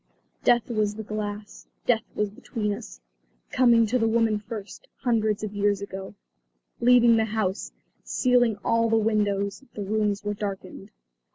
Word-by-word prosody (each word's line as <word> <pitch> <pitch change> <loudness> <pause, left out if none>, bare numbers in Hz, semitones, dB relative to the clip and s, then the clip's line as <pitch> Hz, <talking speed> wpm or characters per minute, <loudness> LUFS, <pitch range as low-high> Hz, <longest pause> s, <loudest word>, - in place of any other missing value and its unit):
Death 240 -1 +3
was 210 -2 0
the 220 - -6
glass; 210 0 -6 0.2
death 230 -3 +3
was 210 -1 -1
between 210 0 -3
us; 210 - -9 0.5
coming 235 -3 +5
to 250 +4 0
the 225 - +2
woman 225 -1 +2
first, 215 - -8
hundreds 220 -4 +1
of 210 -1 -4
years 205 -1 +1
ago, 195 0 -7 0.6
leaving 240 -1 +6
the 220 - +2
house, 215 -3 -2 0.3
sealing 245 -4 +2
all 230 0 +2
the 225 - +3
windows; 205 0 0
the 205 - -4
rooms 210 0 0
were 205 0 -1
darkened. 195 -1 -6
215 Hz, 150 wpm, -26 LUFS, 205-230 Hz, 0.6 s, leaving